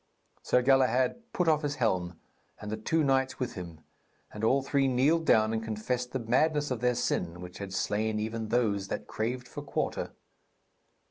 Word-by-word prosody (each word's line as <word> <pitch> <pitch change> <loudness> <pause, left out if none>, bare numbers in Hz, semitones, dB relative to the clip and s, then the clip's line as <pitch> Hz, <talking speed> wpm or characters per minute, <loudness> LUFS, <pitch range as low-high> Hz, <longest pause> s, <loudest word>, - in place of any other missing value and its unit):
Sir 125 - +2
Galahad 135 - +2
put 180 - 0
off 155 -1 +4
his 145 -1 -2
helm, 90 - -1 0.4
and 105 0 -6
the - - 0
two 155 +9 0
knights 135 -1 +1
with 125 -2 -3
him, 85 -4 -8 0.5
and 105 - -7
all 135 +4 +3
three 140 0 +2
kneeled 145 +6 +2
down 110 0 +4
and 110 0 -1
confessed 120 +3 -2
the - - -1
madness 145 +5 +1
of 125 - -1
their 125 0 +2
sin 85 -6 -1
which 90 +1 -9
had 100 -1 -6
slain 105 +2 0
even 110 +1 -3
those 105 -4 +1
that - - -4
craved 125 +3 -3
for 145 - -7
quarter. 145 - -3
125 Hz, 180 wpm, -29 LUFS, 110-135 Hz, 0.5 s, off